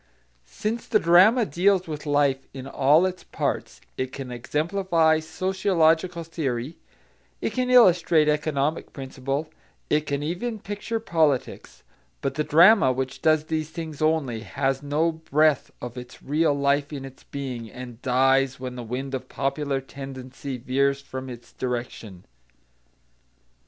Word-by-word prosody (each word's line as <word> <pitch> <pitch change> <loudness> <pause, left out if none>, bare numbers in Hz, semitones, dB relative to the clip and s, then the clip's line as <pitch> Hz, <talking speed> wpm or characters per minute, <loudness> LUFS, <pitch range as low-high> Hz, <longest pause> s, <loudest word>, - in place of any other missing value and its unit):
Since 215 - -4
the 225 - +4
drama 195 +8 +5
deals 185 +4 +2
with 150 -1 -6
life 140 -2 +1
in 130 -1 -7
all 145 +5 +4
its 185 -1 -4
parts, - - -3 0.2
it 130 0 -2
can 135 -3 -7
exemplify 160 +5 +1
sociological 170 0 +1
theory, 145 -4 -4 0.6
it - - -2
can 255 -1 -1
illustrate 175 -10 +5
economic 150 0 0
principle, 135 +2 -4 0.4
it 150 0 +2
can 145 0 -2
even 195 +9 -3
picture 205 +3 -4
politics; 160 - -1 0.4
but 135 - -1
the 150 - -1
drama 170 -1 +6
which 130 0 -4
does 155 -1 +3
these 155 -1 -3
things 160 -2 -7
only, 155 -7 +1
has 135 +6 -2
no 150 +3 +1
breath 155 -2 +1
of 125 0 -7
its 125 0 -12
real 150 +1 +2
life 140 +1 +1
in 140 -2 -6
its 135 0 -13
being, 125 -5 -6
and 125 -1 -10
dies 135 +1 +2
when 125 -1 -6
the 125 - -6
wind 130 +4 -5
of 130 -1 -5
popular 140 0 -1
tendency 135 0 -8
veers 140 +3 +1
from 130 -1 -7
its 120 -1 -11
direction. 120 -6 -5
145 Hz, 140 wpm, -25 LUFS, 130-165 Hz, 0.6 s, drama